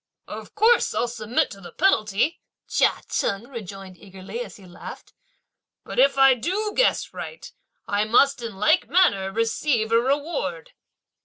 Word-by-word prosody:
"Of -, -, -9 dB
course 445 Hz, +3 st, +3 dB
I'll 240 Hz, -, +1 dB
submit 235 Hz, 0 st, -1 dB
to 195 Hz, -, -11 dB
the 175 Hz, -, -10 dB
penalty," 230 Hz, -, +1 dB, 0.3 s
Chia -, -, +1 dB
Cheng 200 Hz, +4 st, -2 dB
rejoined 195 Hz, -6 st, -9 dB
eagerly, 190 Hz, -, -9 dB
as -, -, -12 dB
he 195 Hz, -, -15 dB
laughed, 175 Hz, -1 st, -11 dB, 0.7 s
"but -, -, -5 dB
if 275 Hz, +1 st, +4 dB
I 270 Hz, -1 st, +7 dB
do 385 Hz, -, -2 dB
guess -, -, +1 dB
right, 475 Hz, -, -8 dB, 0.4 s
I 205 Hz, +1 st, +1 dB
must 250 Hz, +4 st, +3 dB
in 230 Hz, -4 st, -6 dB
like 210 Hz, +3 st, +2 dB
manner 200 Hz, -, +3 dB
receive 230 Hz, +1 st, 0 dB
a 230 Hz, -, +5 dB
reward!" 335 Hz, -, -2 dB
235 Hz, 150 wpm, -24 LUFS, 205-305 Hz, 0.7 s, I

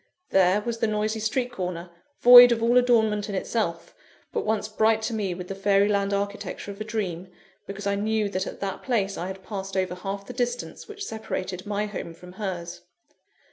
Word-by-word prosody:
There 190 Hz, +2 st, +4 dB
was 230 Hz, +1 st, -4 dB
the 225 Hz, -, +2 dB
noisy 215 Hz, +1 st, -1 dB
street 245 Hz, +4 st, -1 dB
corner, 180 Hz, -4 st, -5 dB, 0.3 s
void 245 Hz, 0 st, +11 dB
of 230 Hz, -1 st, +1 dB
all 235 Hz, +1 st, +3 dB
adornment 220 Hz, -4 st, +2 dB
in 200 Hz, -, -3 dB
itself, 185 Hz, -4 st, -2 dB, 0.4 s
but -, -, -1 dB
once 215 Hz, -1 st, 0 dB
bright 220 Hz, 0 st, +2 dB
to 230 Hz, -, -2 dB
me 200 Hz, -5 st, -2 dB
with 180 Hz, 0 st, -7 dB
the 195 Hz, -, -4 dB
fairy 195 Hz, +1 st, +3 dB
land 200 Hz, -1 st, +1 dB
architecture 200 Hz, 0 st, -3 dB
of 200 Hz, +1 st, -10 dB
a -, -, 0 dB
dream, 195 Hz, -5 st, -3 dB, 0.4 s
because 200 Hz, 0 st, -7 dB
I 200 Hz, -, +1 dB
knew 215 Hz, +1 st, 0 dB
that 190 Hz, 0 st, -2 dB
at -, -, -8 dB
that 195 Hz, -1 st, -3 dB
place 200 Hz, -6 st, 0 dB
I 175 Hz, -, -4 dB
had 190 Hz, 0 st, -8 dB
passed 195 Hz, -1 st, -5 dB
over 185 Hz, -1 st, 0 dB
half 195 Hz, +2 st, -5 dB
the 250 Hz, -, -8 dB
distance 245 Hz, 0 st, -3 dB
which 415 Hz, -2 st, -7 dB
separated 190 Hz, -, -5 dB
my 205 Hz, 0 st, -1 dB
home 195 Hz, -5 st, -6 dB
from 180 Hz, +2 st, -13 dB
hers. 180 Hz, -3 st, -5 dB
205 Hz, 200 wpm, -25 LUFS, 190-220 Hz, 0.4 s, void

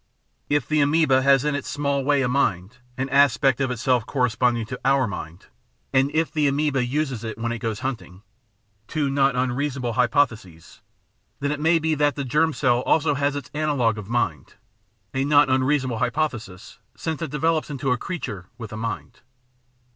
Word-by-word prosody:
If 145 Hz, -3 st, +1 dB
the 155 Hz, -1 st, +2 dB
amoeba 145 Hz, -2 st, +3 dB
has 135 Hz, 0 st, +4 dB
in 150 Hz, -, +1 dB
its 140 Hz, -1 st, -4 dB
small 140 Hz, -1 st, -1 dB
way 140 Hz, 0 st, +2 dB
a -, -, +1 dB
mind> 110 Hz, -4 st, 0 dB, 0.2 s
an 130 Hz, +1 st, -1 dB
aspect 135 Hz, -1 st, +3 dB
of 135 Hz, -, +1 dB
itself 125 Hz, -1 st, +1 dB
corresponding 125 Hz, -3 st, +1 dB
to 125 Hz, +3 st, -7 dB
our 135 Hz, 0 st, +3 dB
mind, 90 Hz, -4 st, -7 dB, 0.5 s
and 135 Hz, +1 st, +3 dB
if 160 Hz, 0 st, +1 dB
the 150 Hz, -2 st, +1 dB
amoeba 140 Hz, -1 st, +1 dB
uses 130 Hz, -2 st, -2 dB
it 110 Hz, -1 st, -5 dB
when 115 Hz, +1 st, -2 dB
it 120 Hz, -, -4 dB
goes 110 Hz, -1 st, -3 dB
hunting 115 Hz, -8 st, -5 dB, 0.3 s
— 105 Hz, 0 st, -43 dB
^two 145 Hz, -3 st, -1 dB
not 135 Hz, -1 st, +2 dB
unreasonable 130 Hz, -1 st, -1 dB
hypotheses 115 Hz, -, -1 dB, 0.3 s
— -, -, -45 dB
then 145 Hz, +1 st, -1 dB
it 150 Hz, -, -3 dB
may 160 Hz, +2 st, +3 dB
be 160 Hz, 0 st, 0 dB
that 145 Hz, -1 st, +1 dB
the 140 Hz, -, -3 dB
germ 150 Hz, +5 st, +2 dB
cell 125 Hz, -5 st, +2 dB
has 150 Hz, +4 st, +2 dB
also 145 Hz, -, +2 dB, 0.2 s
its 140 Hz, -, -8 dB
analogue 140 Hz, -8 st, 0 dB
of 105 Hz, 0 st, -9 dB
mind 85 Hz, -, -2 dB, 0.3 s
— 100 Hz, -2 st, -44 dB
a 135 Hz, 0 st, 0 dB
not 145 Hz, -1 st, +4 dB
unreasonable 130 Hz, -2 st, +1 dB
hypothesis, 120 Hz, -8 st, -3 dB, 0.2 s
since 160 Hz, -1 st, -4 dB
it 165 Hz, -, -3 dB
develops 155 Hz, +1 st, 0 dB
into 135 Hz, -2 st, -2 dB
a 125 Hz, -, +2 dB
creature 105 Hz, -, -5 dB
with 115 Hz, -4 st, -8 dB
a -, -, -5 dB
mind. 100 Hz, -10 st, -5 dB
130 Hz, 185 wpm, -23 LUFS, 115-145 Hz, 0.5 s, has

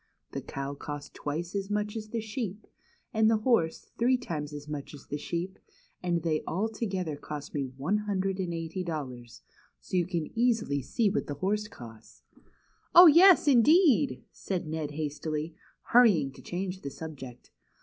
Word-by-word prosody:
The -, -, -4 dB
cow 135 Hz, +1 st, -5 dB
cost 145 Hz, 0 st, -7 dB
twice 165 Hz, +5 st, -4 dB
as 195 Hz, -1 st, -3 dB
much 210 Hz, +1 st, -1 dB
as 215 Hz, -1 st, -5 dB
the 230 Hz, 0 st, -2 dB
sheep, 215 Hz, -2 st, -5 dB, 0.5 s
and 220 Hz, -1 st, +4 dB
the 225 Hz, -, +4 dB
horse 215 Hz, -8 st, +1 dB
three 250 Hz, +2 st, +4 dB
times 155 Hz, -11 st, -5 dB
as 145 Hz, 0 st, -8 dB
much 150 Hz, -1 st, -6 dB
as 140 Hz, -, -14 dB
the 145 Hz, -, -4 dB
sheep, 175 Hz, +5 st, -4 dB, 0.4 s
and 175 Hz, -2 st, 0 dB
they 155 Hz, -2 st, +1 dB
all 200 Hz, +7 st, 0 dB
together 190 Hz, -8 st, -3 dB
cost 145 Hz, 0 st, -7 dB
me 135 Hz, -3 st, -2 dB
one 175 Hz, +10 st, 0 dB
hundred 195 Hz, -2 st, -1 dB
and 180 Hz, -2 st, -2 dB
eighty 165 Hz, +2 st, -4 dB
dol 160 Hz, -4 st, -3 dB
lars; 120 Hz, -2 st, -12 dB, 0.4 s
so -, -, -6 dB
you 175 Hz, -2 st, +2 dB
can 170 Hz, -4 st, -3 dB
easily 225 Hz, -, +1 dB
see 215 Hz, -, 0 dB
what 210 Hz, -, -1 dB
the 145 Hz, -, -4 dB
horse 210 Hz, +7 st, -1 dB
cost." 115 Hz, -, -13 dB, 0.4 s
" -, -, -35 dB
Oh, 350 Hz, +1 st, +12 dB
yes, 345 Hz, +1 st, +8 dB
indeed! 260 Hz, -, +5 dB
" -, -, -46 dB
said 185 Hz, -2 st, -4 dB
Ned 155 Hz, -1 st, -3 dB
hastily, 155 Hz, +1 st, -3 dB, 0.4 s
hurrying 200 Hz, -, +5 dB
to -, -, -14 dB
change 185 Hz, +1 st, -4 dB
the 140 Hz, -, -5 dB
subject. 135 Hz, -5 st, -9 dB
175 Hz, 180 wpm, -29 LUFS, 150-215 Hz, 0.5 s, Oh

